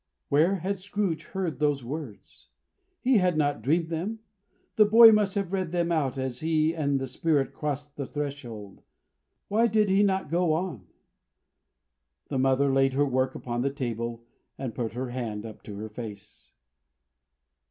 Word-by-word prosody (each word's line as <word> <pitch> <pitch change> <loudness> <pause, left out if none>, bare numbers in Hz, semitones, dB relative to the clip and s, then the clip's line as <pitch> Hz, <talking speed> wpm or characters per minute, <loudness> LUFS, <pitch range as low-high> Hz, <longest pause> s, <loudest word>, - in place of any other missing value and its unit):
'" - - -54
Where 160 +7 +4
had 195 +2 -3
Scrooge 195 -3 -2
heard 185 -6 -3
those 145 -3 +1
words? 140 -5 -8 0.5
He 255 -2 +4
had 180 -3 +1
not 145 -1 +1
dreamed 160 +4 +1
them. 180 +7 -3 0.6
The 215 - +6
boy 225 +2 +9
must 210 -2 +2
have 195 -2 -2
read 185 -4 -1
them 175 -1 0
out, 145 -5 0
as 130 -2 -3
he 160 0 +1
and 140 -4 0
the 135 - -2
Spirit 140 +2 0
crossed 145 -1 -4
the 140 -3 -4
threshold. 125 -9 -6 0.7
Why 225 +3 +3
did 215 -3 +2
he 195 +1 +4
not 190 -2 +1
go 170 -1 +2
on? 155 - -3 1.4
The 135 - -1
mother 135 +1 +3
laid 135 0 +3
her 145 +2 +2
work 130 -1 0
upon 120 -1 -3
the 140 - +1
table, 120 -4 -4 0.3
and 130 -4 -4
put 115 -1 -3
her 125 0 -3
hand 115 -4 -4
up 110 -2 -9
to 105 - -7
her 110 +2 -6
face. 105 -2 -10
145 Hz, 165 wpm, -27 LUFS, 130-180 Hz, 1.4 s, boy